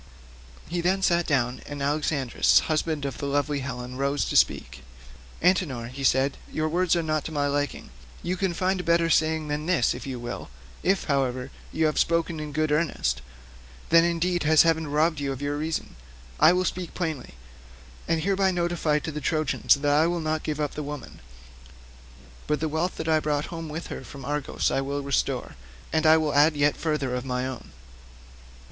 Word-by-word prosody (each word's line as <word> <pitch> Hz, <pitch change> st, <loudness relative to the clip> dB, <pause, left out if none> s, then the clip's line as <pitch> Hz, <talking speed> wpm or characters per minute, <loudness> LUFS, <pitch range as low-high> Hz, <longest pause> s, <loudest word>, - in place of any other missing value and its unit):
He 175 Hz, 0 st, -2 dB
then 190 Hz, +3 st, +1 dB
sat 170 Hz, -2 st, +2 dB
down 125 Hz, -3 st, 0 dB
and 145 Hz, 0 st, -6 dB
Alexandrus 140 Hz, -2 st, +2 dB
husband 155 Hz, -2 st, -1 dB
of 140 Hz, -, -5 dB
lovely 145 Hz, +1 st, 0 dB
Helen 125 Hz, -1 st, -6 dB
rose 140 Hz, +1 st, 0 dB
to -, -, -3 dB
speak. 65 Hz, -, +2 dB, 0.6 s
"Antenor," 145 Hz, -11 st, +1 dB
said 135 Hz, +1 st, +2 dB
he, -, -, -11 dB
"your 155 Hz, 0 st, +1 dB
words 175 Hz, +2 st, +2 dB
are 170 Hz, -, 0 dB
not 155 Hz, -2 st, 0 dB
to -, -, -5 dB
my 145 Hz, -2 st, 0 dB
liking; 145 Hz, -, -2 dB, 0.3 s
you 180 Hz, +2 st, -1 dB
can 185 Hz, -2 st, -1 dB
find 185 Hz, +2 st, 0 dB
a -, -, -3 dB
better 170 Hz, 0 st, +2 dB
saying 155 Hz, 0 st, +2 dB
than 150 Hz, +1 st, -3 dB
this 175 Hz, -10 st, +2 dB
if -, -, -8 dB
you 130 Hz, -2 st, -4 dB
will; 120 Hz, -, -6 dB, 0.3 s
if, 190 Hz, +1 st, +1 dB
however, 130 Hz, -2 st, -1 dB, 0.2 s
you 160 Hz, -, +1 dB
have 155 Hz, -, +1 dB
spoken 165 Hz, -1 st, +1 dB
in 150 Hz, -1 st, -5 dB
good 155 Hz, +1 st, 0 dB
earnest, 145 Hz, -, 0 dB, 0.7 s
then 165 Hz, 0 st, +7 dB
indeed 170 Hz, +1 st, +1 dB
has 155 Hz, 0 st, +6 dB
heaven 160 Hz, -1 st, +1 dB
robbed 155 Hz, +2 st, +1 dB
you 140 Hz, -1 st, -2 dB
of 135 Hz, -, -5 dB
your 145 Hz, +1 st, -2 dB
reason. 155 Hz, +2 st, -3 dB, 0.4 s
I 155 Hz, +2 st, +7 dB
will 180 Hz, +1 st, +1 dB
speak 180 Hz, -1 st, -4 dB
plainly, 160 Hz, -, -4 dB, 0.7 s
and 165 Hz, -1 st, +1 dB
hereby 195 Hz, 0 st, +2 dB
notify 175 Hz, -4 st, 0 dB
to 155 Hz, +1 st, -4 dB
the 150 Hz, 0 st, -5 dB
Trojans 155 Hz, -1 st, +2 dB
that 145 Hz, +1 st, 0 dB
I 155 Hz, +3 st, +4 dB
will 175 Hz, 0 st, -1 dB
not 155 Hz, -1 st, -1 dB
give 155 Hz, -1 st, -3 dB
up 150 Hz, -2 st, -1 dB
the 150 Hz, -, -4 dB
woman; 145 Hz, -2 st, -7 dB, 1.3 s
but 150 Hz, -, +1 dB
the 160 Hz, -, -1 dB
wealth 160 Hz, +4 st, -1 dB
that 160 Hz, -, -4 dB
I 160 Hz, -1 st, +4 dB
brought 150 Hz, -1 st, -1 dB
home 165 Hz, -1 st, -5 dB
with 160 Hz, +3 st, -5 dB
her -, -, -7 dB
from 135 Hz, -2 st, -10 dB
Argos 145 Hz, 0 st, -1 dB
I 135 Hz, -, +1 dB
will 140 Hz, +1 st, -3 dB
restore, 140 Hz, -, -1 dB, 0.4 s
and 160 Hz, -1 st, +2 dB
will 155 Hz, -2 st, +5 dB
add 150 Hz, +2 st, +5 dB
yet 145 Hz, 0 st, +3 dB
further 150 Hz, -5 st, -1 dB
of 125 Hz, 0 st, -2 dB
my 125 Hz, -1 st, -2 dB
own." 130 Hz, -2 st, -6 dB
155 Hz, 190 wpm, -26 LUFS, 140-165 Hz, 1.3 s, then